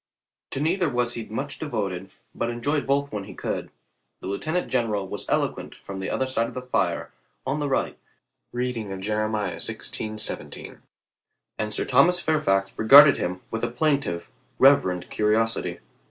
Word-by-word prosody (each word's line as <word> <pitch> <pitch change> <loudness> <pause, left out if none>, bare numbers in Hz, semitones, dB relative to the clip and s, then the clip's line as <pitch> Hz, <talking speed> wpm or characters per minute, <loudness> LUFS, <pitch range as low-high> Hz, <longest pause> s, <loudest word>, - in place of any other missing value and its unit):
To - - -3
neither 170 +3 +1
was 120 -2 0
he 115 -2 -5
much 140 +7 -5
devoted, 100 - -3 0.2
but 115 - -2
enjoyed 140 +5 -1
both 140 +1 +1
when 105 -2 -4
he - - -10
could. - - -3 0.5
The - - -10
lieutenant 155 - -2
gen 125 -3 +1
eral 100 -3 -2
was - - -5
eloquent - - -1
from 95 -1 -8
the 95 - -3
other 130 - 0
side 125 -3 0
of - - -10
the 125 - -3
fire 125 - -1 0.3
on 135 +3 -1
the 145 -1 -1
right 135 - -1 0.5
reading 120 -4 -3
of 95 - -5
Jeremiah 105 -1 -1
xvi:i7, 110 -1 -3 0.8
and 105 0 -1
Sir - - -1
Thomas 150 +8 +4
Fairfax 95 - +1
regarded 140 +6 +9
him 90 +1 -3
with 115 0 -3
a 120 - +1
plaintive, 120 - 0 0.3
rev 140 +1 +7
erent 90 -1 -3
curiosity. 110 +2 +1
120 Hz, 165 wpm, -25 LUFS, 105-140 Hz, 0.8 s, regarded